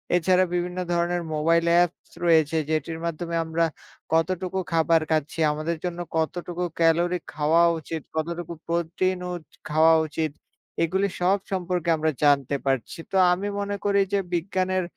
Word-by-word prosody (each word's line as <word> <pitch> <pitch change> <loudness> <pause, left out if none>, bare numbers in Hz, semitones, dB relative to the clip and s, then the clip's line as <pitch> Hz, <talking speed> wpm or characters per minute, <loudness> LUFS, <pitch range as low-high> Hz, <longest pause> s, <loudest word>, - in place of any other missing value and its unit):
এছাড়া 185 +2 +3
বিভিন্ন 180 +1 -2 0.2
ধরনের 175 +1 0
মোবাইল 165 +2 +2
অ্যাপস 175 0 +1 0.2
রয়েছে 160 -1 +4
যেটির 160 +1 -2
মাধ্যমে 170 +1 -3
আমরা 165 +1 +1 0.5
কতটুকু 185 +3 0
খাবার 165 0 +3
খাচ্ছি 155 +1 -1
আমাদের 155 +2 -2
জন্য 175 0 -3 0.2
কতটুকু 175 +2 -2 0.2
ক্যালোরি 170 +2 +3
খাওয়া 155 +3 +3 0.2
উচিত, 160 0 -5
কতটুকু 170 +1 -3
প্রোটিন 170 +2 0
ও - - -3 0.4
খাওয়া 160 +2 +5
উচিত 155 -1 -2 0.5
এগুলি 190 +4 +1
সব 190 +3 +3
সম্পর্কে 180 -2 -1
আমরা 155 0 +1
জানতে 140 -1 +3
পারছি। 135 +1 -1
তো - - -4 0.2
আমি 195 +3 -3
মনে 200 0 -2
করি 200 0 +3
যে 200 - +3
বিজ্ঞানের 185 +1 0
170 Hz, 140 wpm, -25 LUFS, 160-180 Hz, 0.5 s, খাওয়া